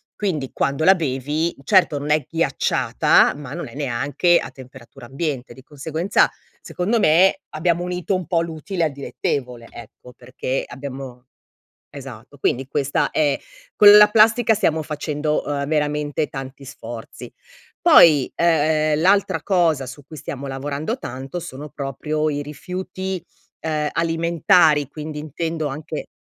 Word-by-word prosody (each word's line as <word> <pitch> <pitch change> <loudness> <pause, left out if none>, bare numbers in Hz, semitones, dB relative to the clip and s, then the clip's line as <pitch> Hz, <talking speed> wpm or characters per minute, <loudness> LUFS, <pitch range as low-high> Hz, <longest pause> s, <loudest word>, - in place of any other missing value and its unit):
quindi 155 -10 -3
quando 140 +3 -1
la 190 +3 +7
bevi, 150 +1 -2
certo 180 -2 +3
non 145 +1 -3
è 150 -3 +1
ghiacciata, 165 -4 +2
ma 140 -2 -8
non 175 - -5
è - - -13
neanche 145 +6 +1
a - - -4
temperatura 130 -2 -13
ambiente, 135 -1 -4
di 130 - -15
conseguenza 155 +6 0 0.3
secondo 210 +6 -1
me 185 - +4
abbiamo 170 +2 0
unito 180 +2 -3
un 185 -4 -4
po' 170 -1 +1
l'utile 170 +2 -4
al 155 - -1
dilettevole, 125 -3 -4
ecco. 120 +2 -13
Perché 130 +1 -4
abbiamo 130 -1 -8 0.7
esatto. 135 0 -11
Quindi 130 0 -1
questa 140 0 0
è 145 -3 +1 0.4
con 205 - +8
la 210 0 +8
plastica, 225 +2 +4
stiamo 160 -7 0
facendo 150 0 -2 0.3
veramente 150 0 -1
tanti 135 0 -8
sforzi. 120 -3 -9 0.5
Poi, 150 -6 +6
ehm, 155 -2 +2
l'altra 200 +3 +2
cosa 165 -8 +1
su 135 +3 -11
cui 155 - -12
stiamo 140 -1 -6
lavorando 140 - -4
tanto 135 +7 -6
sono 150 -2 -8
proprio 150 +2 -3
i 145 -1 -3
rifiuti, 185 +4 -6 0.4
uhm, 155 -2 -1
alimentari 165 -2 +3
quindi 150 +1 -7
intendo 160 +1 -4
anche 145 +2 -6
150 Hz, 135 wpm, -21 LUFS, 135-170 Hz, 0.7 s, con